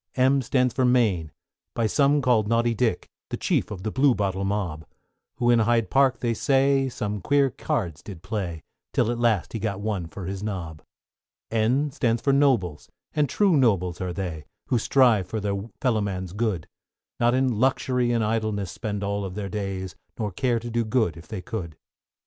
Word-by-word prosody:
=M= 135 Hz, +1 st, +3 dB
stands 125 Hz, -1 st, +1 dB
for 130 Hz, -, +1 dB
Mayne, 110 Hz, -11 st, +2 dB, 0.4 s
by 115 Hz, -, +1 dB
some 140 Hz, +5 st, +3 dB
called 115 Hz, -5 st, +3 dB
Naughty 115 Hz, +1 st, +2 dB
Dick, 115 Hz, -4 st, 0 dB, 0.2 s
The -, -, -3 dB
chief -, -, 0 dB
of 95 Hz, -3 st, -7 dB
the 110 Hz, -, -2 dB
Bluebottle 105 Hz, -8 st, +2 dB
mob; 95 Hz, -6 st, -2 dB, 0.5 s
Who 120 Hz, 0 st, +2 dB
in 120 Hz, -, +5 dB
Hyde 115 Hz, 0 st, +2 dB
Park, 135 Hz, -2 st, +3 dB
they 120 Hz, -1 st, +1 dB
say, 135 Hz, +2 st, +2 dB
some 105 Hz, -5 st, -4 dB
queer 140 Hz, +4 st, +2 dB
cards 85 Hz, -11 st, -3 dB
did 95 Hz, -5 st, -10 dB
play, 95 Hz, -5 st, -4 dB, 0.3 s
Till 115 Hz, -, +2 dB
at 120 Hz, -, -3 dB
last 115 Hz, -6 st, +1 dB
he 115 Hz, -, -2 dB
got 100 Hz, -2 st, -2 dB
one 100 Hz, -5 st, -2 dB
for 90 Hz, +3 st, -8 dB
his 95 Hz, +1 st, -4 dB
nob. 90 Hz, -7 st, -5 dB, 0.7 s
=N= 125 Hz, +6 st, +1 dB
stands 120 Hz, -5 st, 0 dB
for 140 Hz, +3 st, +1 dB
Nobles, 120 Hz, -, +1 dB, 0.2 s
and 150 Hz, -3 st, +1 dB
true 195 Hz, +1 st, +3 dB
nobles 95 Hz, -, +2 dB
are 90 Hz, -1 st, -2 dB
they, 85 Hz, -5 st, -5 dB, 0.2 s
Who 120 Hz, -, +2 dB
strive 115 Hz, -6 st, +3 dB
for 110 Hz, -, -3 dB
their 100 Hz, +1 st, -3 dB
fellow 120 Hz, -5 st, +2 dB
man's 95 Hz, -3 st, -3 dB
good; 105 Hz, -6 st, -1 dB, 0.5 s
Not 120 Hz, +1 st, +3 dB
in 130 Hz, -4 st, +1 dB
luxury 125 Hz, -1 st, +1 dB
and 115 Hz, -2 st, +1 dB
idleness 110 Hz, -3 st, -1 dB
spend 105 Hz, -2 st, -4 dB
all 100 Hz, -1 st, -2 dB
their 100 Hz, +1 st, -5 dB
days, 95 Hz, -2 st, -4 dB, 0.2 s
Nor 105 Hz, -3 st, -2 dB
care 120 Hz, +6 st, 0 dB
to 120 Hz, +1 st, -5 dB
do 120 Hz, 0 st, +1 dB
good 110 Hz, -, +1 dB
if 85 Hz, -, -12 dB
they 105 Hz, -5 st, -6 dB
could. 85 Hz, -8 st, -5 dB
110 Hz, 185 wpm, -25 LUFS, 95-125 Hz, 0.7 s, in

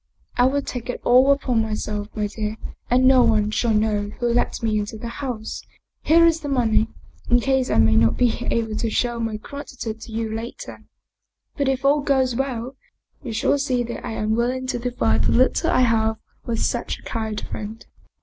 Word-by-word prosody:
" -, -, -38 dB
I 245 Hz, -, +6 dB
will 280 Hz, +1 st, 0 dB
take 245 Hz, -2 st, -6 dB
it -, -, -3 dB
all 255 Hz, +3 st, +5 dB
upon 255 Hz, -4 st, +1 dB
myself, 215 Hz, -1 st, -3 dB
my 210 Hz, -1 st, -1 dB
dear, 215 Hz, +1 st, -4 dB, 0.3 s
and 255 Hz, +1 st, +4 dB
no 260 Hz, -1 st, +7 dB
one 215 Hz, -3 st, +2 dB
shall 230 Hz, +1 st, +1 dB
know 210 Hz, -1 st, +1 dB
who 240 Hz, -1 st, +1 dB
let 240 Hz, -, 0 dB
me 215 Hz, -2 st, +1 dB
into 210 Hz, +1 st, -5 dB
the 235 Hz, -, -6 dB
house. 235 Hz, -3 st, -5 dB, 0.4 s
Here 335 Hz, +2 st, +5 dB
is 325 Hz, -1 st, +2 dB
money, 240 Hz, -6 st, +2 dB, 0.4 s
in 245 Hz, -, +5 dB
case 265 Hz, +1 st, +1 dB
I -, -, +1 dB
may 110 Hz, 0 st, +4 dB
not 115 Hz, +1 st, +3 dB
be 245 Hz, 0 st, +1 dB
able 225 Hz, -2 st, -1 dB
to 230 Hz, -, -1 dB
show 240 Hz, +2 st, -1 dB
my 225 Hz, -1 st, -2 dB
gratitude 230 Hz, -3 st, -7 dB
to 225 Hz, -, -10 dB
you 220 Hz, 0 st, -3 dB
later. 235 Hz, -, -7 dB, 0.7 s
But 280 Hz, -2 st, 0 dB
if 265 Hz, 0 st, -1 dB
all 290 Hz, +1 st, +4 dB
goes 265 Hz, -3 st, +1 dB
well, 260 Hz, -1 st, -3 dB, 0.5 s
you 235 Hz, -, -6 dB
shall 255 Hz, +5 st, +1 dB
see 255 Hz, -3 st, 0 dB
that 235 Hz, 0 st, -6 dB
I -, -, -4 dB
am 215 Hz, 0 st, -1 dB
will 235 Hz, +1 st, +1 dB
ing 260 Hz, 0 st, -3 dB
to 245 Hz, -, -1 dB
divide 115 Hz, -, 0 dB
the -, -, +2 dB
little 260 Hz, +6 st, +3 dB
I 255 Hz, -, +3 dB
have 220 Hz, -2 st, +2 dB, 0.3 s
with 230 Hz, -1 st, -1 dB
such -, -, -2 dB
a -, -, -19 dB
kind 220 Hz, -2 st, -3 dB
friend." 215 Hz, +2 st, -7 dB
235 Hz, 205 wpm, -22 LUFS, 220-260 Hz, 0.7 s, no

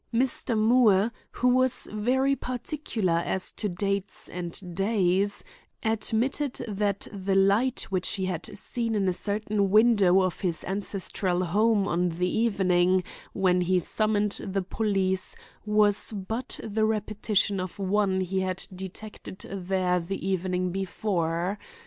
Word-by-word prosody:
Mr. 240 Hz, -1 st, +1 dB
Moore, 220 Hz, -2 st, +4 dB, 0.2 s
who 250 Hz, -, -1 dB
was 255 Hz, 0 st, +2 dB
very 260 Hz, +6 st, +2 dB
particular 245 Hz, -, -2 dB
as 190 Hz, -, -1 dB
to 210 Hz, -, -3 dB
dates 195 Hz, +2 st, -3 dB
and 175 Hz, 0 st, -5 dB
days, 195 Hz, 0 st, +1 dB, 0.4 s
admitted 230 Hz, +5 st, 0 dB
that 205 Hz, -1 st, -1 dB
the 195 Hz, -1 st, -1 dB
light 200 Hz, +6 st, +3 dB
which 185 Hz, -1 st, 0 dB
he 190 Hz, -, -2 dB
had 180 Hz, -3 st, -3 dB
seen 230 Hz, +2 st, -2 dB
in 200 Hz, -2 st, +1 dB
a 185 Hz, -, +2 dB
certain 205 Hz, +1 st, 0 dB
window 205 Hz, -3 st, +5 dB
of 185 Hz, -2 st, -2 dB
his 175 Hz, -5 st, -1 dB
ancestral 190 Hz, -1 st, -2 dB
home 205 Hz, +3 st, +2 dB
on 180 Hz, -1 st, +1 dB
the 175 Hz, +2 st, -1 dB
evening 185 Hz, -4 st, +2 dB, 0.3 s
when 180 Hz, -2 st, +2 dB
he 185 Hz, +1 st, +2 dB
summoned 210 Hz, +3 st, +1 dB
the 195 Hz, 0 st, -2 dB
police 190 Hz, -2 st, 0 dB, 0.3 s
was 210 Hz, 0 st, +3 dB
but 220 Hz, +5 st, -3 dB
the 220 Hz, 0 st, -1 dB
repetition 210 Hz, -2 st, 0 dB
of 185 Hz, -1 st, -5 dB
one 195 Hz, -1 st, +1 dB
he 190 Hz, +1 st, -1 dB
had 185 Hz, 0 st, -1 dB
detected 190 Hz, +1 st, -8 dB
there 185 Hz, -1 st, 0 dB
the 190 Hz, +2 st, -4 dB
evening 185 Hz, -1 st, 0 dB
before. 185 Hz, -1 st, -1 dB
195 Hz, 130 wpm, -27 LUFS, 185-215 Hz, 0.4 s, window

